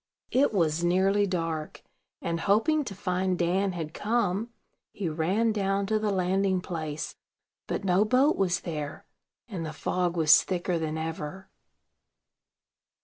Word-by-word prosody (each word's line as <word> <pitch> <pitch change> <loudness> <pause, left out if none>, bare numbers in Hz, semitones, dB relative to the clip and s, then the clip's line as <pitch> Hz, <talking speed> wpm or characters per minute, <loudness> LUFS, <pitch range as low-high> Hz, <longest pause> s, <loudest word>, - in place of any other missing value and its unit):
It 275 +3 +3
was 170 -5 +1
nearly 195 +3 +3
dark; 165 -4 -3 0.4
and, 170 0 -1
hoping 230 - +2
to 200 - -6
find 185 -1 -1
Dan 185 +3 +1
had 160 -3 -5
come, 215 -1 0 0.4
he 195 - -3
ran 180 +9 +1
down 200 -1 0
to 215 +2 +1
the 215 0 0
landing 190 0 +1
place. 155 -4 -5 0.5
But - - -2
no 190 +1 +3
boat 255 +7 +3
was 180 -2 +1
there, 150 -4 -5 0.4
and 190 -8 -5
the 155 -1 -5
fog 175 +2 -1
was 155 -2 +7
thicker 175 -2 -1
than 160 -1 -2
ever. 160 +3 -5
185 Hz, 140 wpm, -28 LUFS, 165-200 Hz, 0.5 s, was